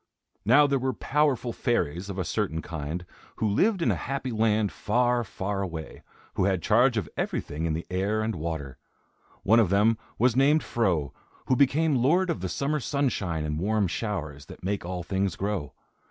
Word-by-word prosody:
Now 135 +7 +6
there 140 -1 +1
were 130 +1 -1
powerful 135 -5 0
fairies, 95 -5 -1
of 100 - -5
a 95 - -1
certain 80 -4 -2
kind, 80 +2 -5 0.3
who 110 - 0
lived 185 - +2
in - - +3
a - - +1
Happy 135 -2 -2
Land 110 -2 +2
far, 120 +3 +1
far 100 0 -3
away, 85 -4 -6 0.3
who - - +1
had 95 -3 0
charge 120 +3 +4
of 100 -8 -1
everything 80 +3 -2
in 80 - 0
the 80 +2 -3
air 100 +4 0
and 110 +1 -1
water. 80 -5 -5 0.6
One 115 +4 +5
of 110 -6 +3
them 105 +3 +3 0.2
was 120 +1 +3
named 145 +4 +4
Fro, 85 - 0 0.3
who 130 - +2
became 145 +4 +3
lord 175 +7 +3
of 165 - -3
the 95 - -3
summer 140 - -1
sunshine 110 - -1
and 75 0 -2
warm 105 +3 +1
showers, 80 -8 -4
that - - -12
make 100 +2 -2
all 90 0 -4
things 95 +1 -1
grow. 100 -8 -3
105 Hz, 185 wpm, -27 LUFS, 85-125 Hz, 0.6 s, Now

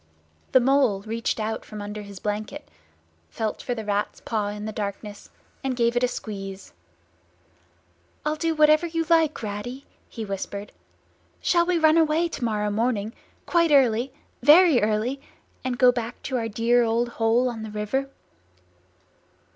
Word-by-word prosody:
The 260 - +6
Mole 255 -6 +3
reached 225 +2 -2
out 220 +1 -3
from 215 - -9
under 205 +1 -6
his 200 -2 -10
blanket, 215 +9 -4 0.6
felt 220 -2 -3
for 245 - -3
the 220 -2 -6
Rat's 205 0 -1
paw 215 -2 -2
in 210 +1 -5
the 215 - -3
darkness, 205 0 -6 0.3
and 265 -1 -1
gave 235 0 +2
it 245 - +2
a - - +4
squeeze. 195 -5 -7 1.5
"I'll 305 0 +1
do 325 +1 -1
whatever 305 +2 +5
you 330 0 -2
like, 320 -6 +3
Ratty," 220 +6 -5 0.2
he 225 -2 -6
whispered. 200 +1 -5 0.7
"Shall 345 -1 +2
we 360 -1 +2
run 315 0 +5
away 320 +2 +2
to 275 - -6
morrow 210 -2 0
morning, 220 0 -1 0.3
quite 335 -1 +3
early—very 275 +4 +4
early—and 245 +3 -3
go 250 0 +6
back 240 -1 -5
to 260 - -2
our 230 -2 -1
dear 230 +3 +2
old 235 +1 +1
hole 230 +2 +2
on 235 -3 -4
the 220 - -6
river?" 210 +6 -2
235 Hz, 150 wpm, -25 LUFS, 210-275 Hz, 1.5 s, The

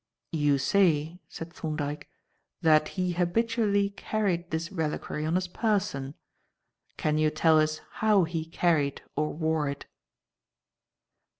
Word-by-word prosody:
"You 145 -3 +2
say," 165 +1 +2
said 165 +1 -8
Thorndyke, 150 -2 -4 0.5
"that 155 -1 +5
he 180 -1 +1
habitually 200 +3 +1
carried 195 -4 -1
this 165 +3 -3
reliquary 155 -3 -3
on 165 - 0
his 185 0 0
person. 185 - -1 0.8
Can 155 0 +1
you 155 0 +3
tell 155 +1 +4
us 155 0 0 0.2
how 210 -3 +5
he 160 -1 -3
carried 160 -4 +1
or 150 +1 0
wore 160 -2 0
it?" 140 0 -6
160 Hz, 120 wpm, -28 LUFS, 155-185 Hz, 0.8 s, that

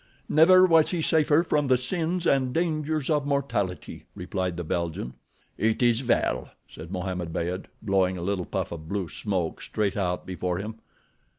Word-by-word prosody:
"Never 185 +4 +7
was 165 -3 +5
he 170 -3 -1
safer 155 0 +3
from 150 -4 +1
the 130 -1 +4
sins 170 +7 -2
and 130 -2 +2
dangers 155 -3 0
of 150 -2 +1
mortality," 120 -10 -2
replied 90 -1 -3
the 85 - -3
Belgian. 80 -6 -3 0.5
"It 110 +2 +1
is 120 +1 +3
well," 125 - 0 0.2
said 80 +3 -11
Mohammed 90 -2 -3
Beyd, 90 +3 -3 0.2
blowing 95 -3 +1
a 85 - -5
little 95 -1 -1
puff 95 -1 -3
of 80 -1 -8
blue 100 -4 -2
smoke 95 -6 -3
straight 105 -3 -1
out 90 -3 -1
before 90 -1 -2
him. 110 +3 -6
105 Hz, 165 wpm, -26 LUFS, 90-150 Hz, 0.5 s, Never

